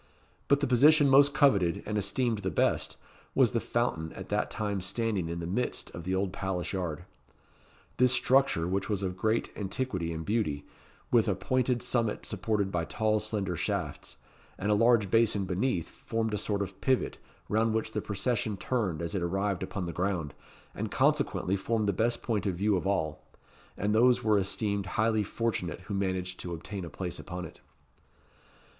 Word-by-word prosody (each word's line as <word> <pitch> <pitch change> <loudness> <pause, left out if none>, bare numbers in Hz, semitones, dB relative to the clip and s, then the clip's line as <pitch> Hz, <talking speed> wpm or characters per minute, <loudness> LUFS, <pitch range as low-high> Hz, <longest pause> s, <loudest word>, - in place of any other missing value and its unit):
But 140 0 +3
the - - +3
position 145 +4 +6
most 140 +2 +7
coveted, 110 - +3
and 105 - -3
esteemed 110 +3 0
the 95 -2 -2
best, - - 0 0.4
was - - +5
the - - +1
fountain 80 0 -1
at - - -9
that - - 0
time 105 -2 -2
standing 95 -2 0
in 85 0 -3
the 85 - -4
midst 100 +9 -2
of 85 -1 -8
the 95 +1 0
old 95 -1 -1
palace 95 -2 -3
yard. 90 -3 -3 0.9
This 125 0 +5
structure, 130 -12 +3
which 95 +2 -1
was 100 -2 -1
of 90 -1 -2
great 110 +4 0
antiquity 95 -4 -2
and 80 0 -5
beauty, 100 -10 -1 0.5
with 115 -2 +4
a 100 - +2
pointed 125 +5 0
summit 115 -4 0
supported 105 -3 -1
by 85 -2 0
tall 110 +6 +1
slender 105 -4 -2
shafts, - - -3 0.4
and 100 +2 0
a - - +5
large 110 -2 +4
basin 115 -3 +3
beneath, 95 0 0
formed 115 -1 -3
a - - +1
sort 100 -1 -1
of 100 - -9
pivot, 130 -1 +1 0.3
round 110 +1 +2
which 110 0 -1
the - - -2
procession 105 +1 -1
turned 95 -9 -1
as 85 - -3
it 95 - -1
arrived 95 +2 -1
upon 95 0 -3
the 85 - -4
ground, 90 -5 -1 0.4
and - - -3
consequently 95 - +1
formed 105 +2 0
the 100 - +2
best 115 +5 0
point 105 -4 -1
of 95 - 0
view 100 +3 +2
of 95 - -1
all; 80 -6 -1 0.6
and 105 +1 0
those 120 +3 +4
were 105 -2 +4
esteemed 100 0 -1
highly 110 0 +3
fortunate 105 -4 -2
who 105 - -7
managed 95 -1 -2
to 85 -1 -4
obtain 95 +4 -6
a 85 - -6
place 90 0 -5
upon 90 0 -6
it. - - -12
100 Hz, 180 wpm, -29 LUFS, 90-115 Hz, 0.9 s, most